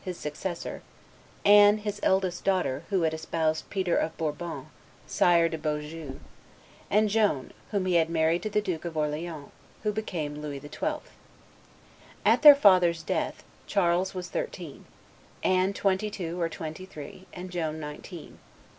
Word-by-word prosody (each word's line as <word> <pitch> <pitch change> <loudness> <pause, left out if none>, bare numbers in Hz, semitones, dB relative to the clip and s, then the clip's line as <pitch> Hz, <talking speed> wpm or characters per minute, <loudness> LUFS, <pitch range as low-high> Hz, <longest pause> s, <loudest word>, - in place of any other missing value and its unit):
his 180 -2 -5
successor; 170 +4 -5 0.6
Anne, 205 +1 +8
his 210 -1 -4
eldest 190 -2 +1
daughter, 170 -7 0
who 190 -4 +1
had 160 -1 +1
espoused 160 0 -1
Peter 185 -3 0
of 160 - -1
Bourbon, 160 +2 -4 0.4
Sire 170 -1 +4
de 160 -1 -4
Beaujeu; 150 -1 -4 0.7
and 215 +2 +4
Joan, 205 -11 +1 0.2
whom 200 -3 -1
he 185 - +1
had 165 -1 +3
married 165 +1 +2
to 215 - -3
the 210 0 +1
Duke 180 -6 -3
of 170 -2 -5
Orleans, 150 0 -3 0.3
who 210 - +1
became 160 -9 -4
Louis 145 -2 -5
XII. 145 +1 -3 1.2
At - - +5
their 295 -2 +11
father's 180 - +4
death, - - -2 0.2
Charles 185 -1 +1
was 180 -1 -5
thirteen; - - -5 0.6
Anne 185 +1 +3
twenty 200 +1 0
two 175 -3 -5
or 165 - +1
twenty 160 +3 -7
three; 170 +4 -10
and 180 +1 -8
Joan 160 -3 -2
nineteen. 150 +3 -9
175 Hz, 145 wpm, -28 LUFS, 160-190 Hz, 1.2 s, their